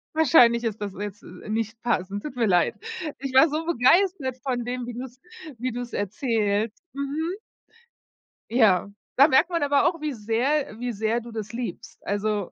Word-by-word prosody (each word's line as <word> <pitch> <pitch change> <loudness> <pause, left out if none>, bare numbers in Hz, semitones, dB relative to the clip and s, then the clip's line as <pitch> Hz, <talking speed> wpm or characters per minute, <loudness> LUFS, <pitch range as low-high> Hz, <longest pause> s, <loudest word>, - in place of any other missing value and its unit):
Wahrscheinlich 240 -6 +5
ist 220 -2 -3
das 200 -2 -4
jetzt, 205 -1 -6
äh, - - -11
nicht 225 +1 -3
passend, 200 -3 -1
tut 280 -4 -6
mir 235 -2 +1
leid. 180 -3 +3 0.4
Ich 270 0 -5
war 265 +5 +7
so 310 +2 -2
begeistert 320 -2 +2
von 250 -3 -2
dem, 245 0 -3
wie 245 - -5
du's 250 +1 -8 0.4
wie 255 +2 -2
du's 245 0 -6
erzählst. 210 - -1
Mhm. 285 +5 -2 1.2
Ja, 205 -5 +3 0.2
da 280 +3 +7
merkt 310 +5 +4
man 335 - 0
aber 285 0 +3
auch, 335 -2 -2
wie 305 - -1
sehr 235 +3 -1
wie 245 0 -2
sehr 220 +2 -1
du 235 0 -10
das 220 0 -6
liebst. 230 -1 -6
Also, 205 -1 -1
240 Hz, 175 wpm, -25 LUFS, 215-275 Hz, 1.2 s, war